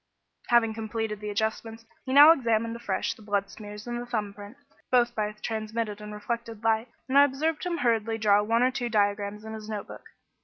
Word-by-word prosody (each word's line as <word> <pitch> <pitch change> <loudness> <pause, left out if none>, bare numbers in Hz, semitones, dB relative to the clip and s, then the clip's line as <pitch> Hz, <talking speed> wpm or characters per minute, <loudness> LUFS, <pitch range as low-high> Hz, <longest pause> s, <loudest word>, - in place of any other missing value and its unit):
Having 235 -2 +3
completed 220 -1 -4
the 210 0 -5
adjustments, 220 +2 -3 0.2
he - - -2
now 290 +4 +9
examined 230 -6 +1
afresh 220 -5 -2
the - - -18
blood 200 -1 -1
smears 210 -1 -10
and 240 0 -4
the 245 - -8
thumb 215 -4 -3
print, 205 +5 -11 0.3
both 240 -1 +3
by 210 -2 -1
transmitted 220 -1 -3
and 210 0 -8
reflected 230 +1 -5
light, 225 +1 +2 0.2
and 270 +2 +4
I - - +9
observed 295 +3 0
him 345 -1 -1
hurriedly 225 -3 +1
draw 205 -2 +4
one 230 +3 +2
or 255 - +3
two 245 -2 -3
diagrams 205 0 0
in 220 - -7
his 215 0 -8
notebook. 210 -2 -7
225 Hz, 195 wpm, -27 LUFS, 210-240 Hz, 0.3 s, now